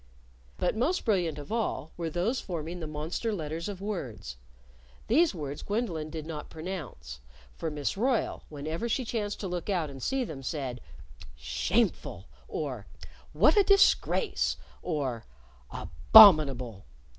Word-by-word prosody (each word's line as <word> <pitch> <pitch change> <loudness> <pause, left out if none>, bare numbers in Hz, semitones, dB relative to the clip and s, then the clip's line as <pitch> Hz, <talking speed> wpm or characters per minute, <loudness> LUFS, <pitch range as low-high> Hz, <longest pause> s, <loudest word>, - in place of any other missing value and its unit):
But 180 - 0
most 295 +12 0
brilliant 180 - +1
of 145 +6 -9
all 220 -8 -2
were 165 -1 -3
those 185 +11 -1
forming 170 -1 -5
the 160 - -5
monster 155 +9 -3
letters 165 -2 -4
of 195 -2 -7
words. 130 - -5 0.7
These 295 - +3
words 145 -3 -5
Gwendolyn 200 -8 -2
did 155 -1 -6
not 155 -2 -6
pronounce. 155 - -7 0.3
For 160 - -4
Miss 150 -2 -2
Royle, 240 +4 0
whenever 155 +9 -4
she 255 +2 0
chanced 210 -3 -3
to 195 - -3
look 180 +2 -4
out 170 -7 0
and 135 -1 -10
see 265 - 0
them, 155 - -7
said 130 -3 -4 0.5
"Shameful!" - - -1 0.2
or 130 -9 -4 0.4
"What 205 - +4
a 410 - +6
disgrace!" 395 +3 +3 0.2
or 135 -9 -3 0.4
"Abominable!" 135 - +6
165 Hz, 135 wpm, -29 LUFS, 145-210 Hz, 0.7 s, a